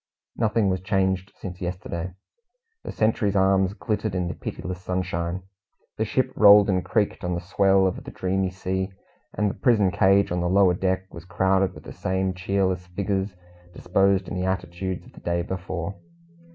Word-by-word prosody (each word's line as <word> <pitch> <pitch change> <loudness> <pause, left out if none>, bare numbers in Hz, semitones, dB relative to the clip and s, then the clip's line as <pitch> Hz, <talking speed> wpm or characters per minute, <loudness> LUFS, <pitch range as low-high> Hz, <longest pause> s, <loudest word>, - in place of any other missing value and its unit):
Nothing 110 -2 +1
was 95 -1 0
changed 95 0 0
since 90 -1 -8
yesterday. 90 0 -4 0.7
The - - -5
sentries' 110 -2 +1
arms 95 0 +3
glittered 105 -3 -2
in 90 -1 0
the - - -3
pitiless 90 0 -6
sunshine, 90 -1 -2 0.5
the 110 - 0
ship 130 +4 0
rolled 105 -1 +8
and 90 -1 +1
creaked 105 -4 0
on 90 0 -1
the - - -2
swell 95 +2 +3
of 95 - -2
the - - -8
dreamy 95 0 -1
sea, 95 +1 -3 0.5
and 105 - +1
the 100 - -1
prison 105 -7 +3
cage 95 +2 +3
on 90 0 0
the 90 - 0
lower 95 -1 +5
deck 95 +1 -1
was 85 0 -9
crowded 95 +1 +1
with - - -12
the - - -9
same 95 0 -1
cheerless 95 -1 -1
figures, 95 +1 -2 0.4
disposed 95 +1 +2
in - - -6
the 90 -1 -2
attitudes 95 0 -3
of - - -17
the - - -14
day 85 0 -1
before. 90 0 -4
95 Hz, 175 wpm, -25 LUFS, 90-100 Hz, 0.7 s, rolled